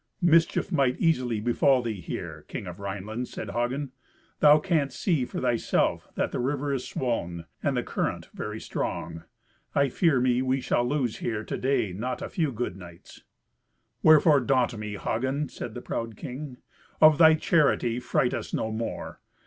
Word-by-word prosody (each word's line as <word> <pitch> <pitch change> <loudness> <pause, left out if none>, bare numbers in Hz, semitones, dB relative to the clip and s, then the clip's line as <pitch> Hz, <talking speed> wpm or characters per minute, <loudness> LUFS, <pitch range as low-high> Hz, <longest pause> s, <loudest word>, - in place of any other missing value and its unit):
"Mischief 165 -1 +3
might 135 -5 +2
easily 125 -9 +1
befall 120 +3 +3
thee 110 -5 -4
here, 80 - -6
King - - -6
of 90 0 -8
Rhineland," 105 +5 -4
said - - -6
Hagen; 125 +3 -2 0.5
"thou 150 0 +7
canst 150 -5 0
see 160 -10 +1
for - - -5
thyself 120 -2 0
that - - -1
the - - -3
river 140 +2 -1
is 130 -2 -3
swoln, 85 -10 -3 0.2
and - - 0
the - - 0
current - - -3
very - - -5
strong. 80 0 -4 0.5
I 140 -1 +3
fear 155 0 +2
me 125 0 +2
we 130 +1 +1
shall 120 -1 0
lose 130 -4 -1
here 110 -2 -3
to - - -4
day 130 -8 0
not 125 +6 -4
a - - -5
few 160 -5 0
good 120 -6 -3
knights." 85 -2 -13 0.8
"Wherefore 155 -1 +6
daunt 125 -1 +1
me, 105 -1 -5
Hagen?" 130 +7 -1
said 115 - -7
the 120 - -5
proud 115 -2 -4
king. 130 0 -7 0.4
"Of 155 0 +7
thy 160 -1 +8
charity 145 -7 +2
fright 125 0 0
us - - -3
no 110 - -2
more. 115 +1 -5
125 Hz, 170 wpm, -27 LUFS, 115-140 Hz, 0.8 s, thy